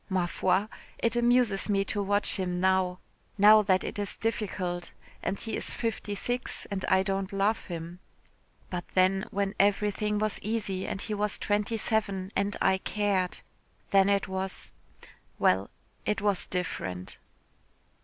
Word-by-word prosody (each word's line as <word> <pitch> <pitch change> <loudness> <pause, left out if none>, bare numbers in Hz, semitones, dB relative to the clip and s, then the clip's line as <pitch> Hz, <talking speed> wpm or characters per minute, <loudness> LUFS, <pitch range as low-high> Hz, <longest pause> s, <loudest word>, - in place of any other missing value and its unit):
Ma 185 -2 +1
foi, 185 +3 +1 0.3
it 230 0 0
amuses 240 -4 +3
me 195 -1 +2
to 205 +1 -2
watch 205 +1 +1
him 180 -2 -1
now 185 -1 +2 0.4
now 210 +1 +8
that 190 -2 +2
it - - -4
is 205 - -3
difficult, 185 -6 -2 0.3
and 195 +2 -2
he 225 - -3
is - - -3
fifty 220 -3 -2
six 245 +4 -2
and 190 -2 -2
I 190 0 +4
don't 195 0 -2
love 200 +3 +1
him 170 0 -6 0.7
but 175 -1 -2
then, 190 +1 +3
when 200 0 -1
everything 210 +1 +2
was 215 0 0
easy 205 -3 -2
and - - -3
he 215 - -2
was 210 0 0
twenty 210 +2 0
seven 200 -4 -1
and 200 +1 0
I 190 0 +3
cared 195 -3 0 0.5
then 195 0 +5
it 200 -1 +2
was 190 0 -4 0.7
well, 95 +2 +3 0.3
it 210 - 0
was 200 -2 0
different." 95 - -4
195 Hz, 150 wpm, -29 LUFS, 185-210 Hz, 0.7 s, now